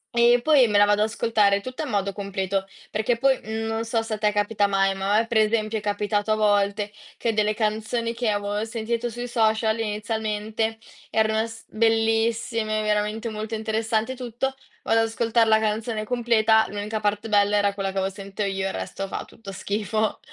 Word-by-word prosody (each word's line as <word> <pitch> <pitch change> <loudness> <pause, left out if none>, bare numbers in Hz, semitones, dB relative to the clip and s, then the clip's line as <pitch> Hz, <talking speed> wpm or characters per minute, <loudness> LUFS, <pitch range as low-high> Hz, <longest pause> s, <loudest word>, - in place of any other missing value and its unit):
E 240 +1 +5
poi 290 -4 +5
me 205 -1 +3
la 205 - +7
vado 205 0 +3
a - - +5
ascoltare 215 -3 +2
tutta 255 +7 -5
in 290 - -5
modo 200 -2 0
completo, 195 -1 -2 0.2
perché 220 +3 0
po 270 +4 +2
mhmm, 225 -4 -1
non 225 0 -2
so 225 0 0
se 225 -1 -4
a - - -5
te 210 0 +2
capita 205 0 +1
mai, 195 -1 +2
ma 195 +1 -1
a - - +5
me 230 - -1
per 230 - +2
esempio 215 0 +1
è - - -5
capitato 205 +1 0
a - - +4
volte 205 -1 +1 0.2
che 230 - 0
delle 215 0 +1
canzoni 220 +2 -1
che 235 -1 -1
avevo 205 +1 -1
sentito 230 +1 -2
sui 240 +2 -5
social 220 -1 +1
inizialmente 220 +1 -2 0.3
erano 220 0 +2
s 225 0 -11
bellissime, 225 0 +1
veramente 215 +2 -1
molto 215 +1 -5
interessanti 220 +2 -1
e - - -8
tutto. 250 +2 -3 0.3
Vado 225 - +2
ad 225 - +2
ascoltar 225 +1 +1
la 220 0 +4
canzone 215 0 -1
completa. 220 -2 +3
L'unica 210 +2 -3
parte 210 +1 -1
bella 205 -1 +3
era 200 -1 +1
quella 195 -1 -2
che 195 - -3
avevo 190 0 0
sento 195 +1 -6
io, 195 -1 -1
il 195 - -2
resto 195 - -4
fa - - -5
tutto 200 -3 -11
schifo. 215 +3 -1
220 Hz, 200 wpm, -24 LUFS, 205-225 Hz, 0.3 s, la